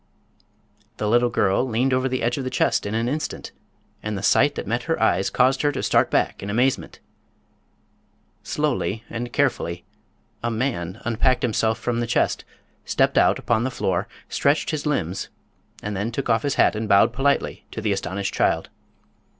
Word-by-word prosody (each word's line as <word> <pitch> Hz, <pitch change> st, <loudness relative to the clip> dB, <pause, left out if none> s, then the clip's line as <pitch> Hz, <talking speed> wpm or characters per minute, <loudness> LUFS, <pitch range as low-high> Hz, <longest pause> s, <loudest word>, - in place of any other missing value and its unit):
The 105 Hz, -, -1 dB
little 120 Hz, +2 st, +3 dB
girl 105 Hz, -2 st, +2 dB
leaned 130 Hz, +1 st, 0 dB
over 130 Hz, +1 st, +1 dB
the 130 Hz, -1 st, -2 dB
edge 120 Hz, +3 st, 0 dB
of -, -, -3 dB
the 130 Hz, -, -2 dB
chest -, -, +1 dB
an 115 Hz, +3 st, -1 dB
instant, 150 Hz, +4 st, -4 dB, 0.5 s
and 105 Hz, -1 st, -3 dB
the 100 Hz, -, -6 dB
sight 140 Hz, +7 st, +4 dB
that -, -, -4 dB
met 120 Hz, +4 st, -1 dB
her 165 Hz, -, +1 dB
eyes 100 Hz, -4 st, +2 dB
caused 130 Hz, +1 st, +2 dB
her 145 Hz, -, +2 dB
to 135 Hz, -, -3 dB
start -, -, +3 dB
back -, -, 0 dB
in 100 Hz, -, -5 dB
amazement. 125 Hz, +5 st, 0 dB, 1.4 s
Slowly 110 Hz, +3 st, -1 dB
and 120 Hz, +1 st, -4 dB
carefully 90 Hz, -11 st, -1 dB, 0.6 s
a 120 Hz, -, -1 dB
man 110 Hz, -6 st, -2 dB
unpacked 125 Hz, +2 st, +1 dB
himself 110 Hz, -2 st, +1 dB
from 120 Hz, +1 st, -2 dB
the 120 Hz, -, -1 dB
chest, -, -, +1 dB, 0.4 s
stepped -, -, +2 dB
out -, -, +4 dB
upon 110 Hz, +3 st, 0 dB
the 130 Hz, -, 0 dB
floor, 95 Hz, -7 st, -1 dB, 0.2 s
stretched 145 Hz, +4 st, +1 dB
his 155 Hz, -1 st, -3 dB
limbs 95 Hz, -, -2 dB, 0.5 s
and 105 Hz, 0 st, -3 dB
then 105 Hz, +4 st, -2 dB
took 125 Hz, 0 st, -1 dB
off 115 Hz, 0 st, +3 dB
his 140 Hz, +2 st, -1 dB
hat -, -, +4 dB
and 110 Hz, 0 st, -3 dB
bowed 105 Hz, +3 st, +5 dB
politely 140 Hz, +3 st, 0 dB
to -, -, -6 dB
the 110 Hz, -1 st, 0 dB
astonished 95 Hz, 0 st, -2 dB
child. -, -, +1 dB
115 Hz, 175 wpm, -23 LUFS, 105-130 Hz, 1.4 s, bowed